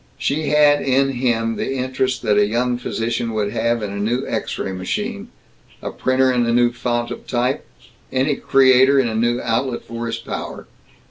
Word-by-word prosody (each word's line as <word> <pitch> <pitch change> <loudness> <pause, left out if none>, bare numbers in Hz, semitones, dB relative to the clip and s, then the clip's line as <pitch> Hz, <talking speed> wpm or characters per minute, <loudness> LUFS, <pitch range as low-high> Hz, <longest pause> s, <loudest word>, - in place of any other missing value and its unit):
She 150 +2 -1
had 150 -1 +4
in 135 +1 +2
him 120 -3 0
the 135 - -2
interest 130 0 -1
that 105 -3 +2
a 105 0 +4
young 120 +2 0
physician 115 -1 -2
would 105 -1 -1
have 115 -1 0
in 100 - -3
a 100 - -5
new 120 +6 -1
X - - -3
ray - - -3
machine, 205 - -4 0.5
a - - -5
printer 130 0 +2
in 120 -1 +2
a - - +2
new 120 0 +3
font 120 -1 -2
of - - -8
type, 125 +1 -1 0.4
any 135 +2 +1
creator 130 +1 +5
in 130 - +2
a 115 - -3
new 120 +2 +1
outlet 120 +2 -1
for 115 0 -5
his 115 0 -3
power. 115 - -6
120 Hz, 190 wpm, -20 LUFS, 115-130 Hz, 0.5 s, creator